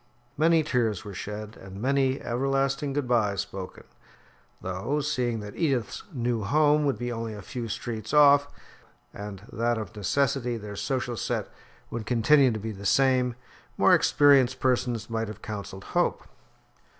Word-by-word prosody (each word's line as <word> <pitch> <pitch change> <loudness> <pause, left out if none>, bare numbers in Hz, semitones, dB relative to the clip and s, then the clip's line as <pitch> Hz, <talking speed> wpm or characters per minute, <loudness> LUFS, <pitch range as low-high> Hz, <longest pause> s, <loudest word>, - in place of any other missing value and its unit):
Many 160 +1 +4
tears 115 -9 0
were 100 - -7
shed, 105 +3 -6
and 95 0 -10
many 135 +2 +1
everlasting 135 +3 -1
good 145 -2 -1
byes 105 -5 +2
spoken, 95 -1 -8 0.8
though, 95 +11 -2
seeing 125 -6 -1
that 105 0 -8
Edith's 135 -9 -1
new 120 -5 -1
home 150 +6 +3
would 140 - +1
be 120 0 -3
only 115 -2 -4
a 100 - -9
few 120 +3 -5
streets 110 0 -5
off, 145 -1 +6 0.7
and 100 -1 -8
that 120 +1 0
of 110 +1 -6
necessity 125 +3 0
their 105 -2 -8
social 125 +1 -2
set - - -2 0.4
would 115 -3 -5
continue 130 +3 +4
to 110 -2 -2
be 110 +2 -4
the 100 -1 -9
same, 125 +2 +3 0.4
more - - +5
experienced 135 -3 +4
persons 125 -3 0
might 115 -1 -2
have 105 - -9
counselled 100 -2 -6
hope. - - 0
120 Hz, 150 wpm, -27 LUFS, 105-135 Hz, 0.8 s, off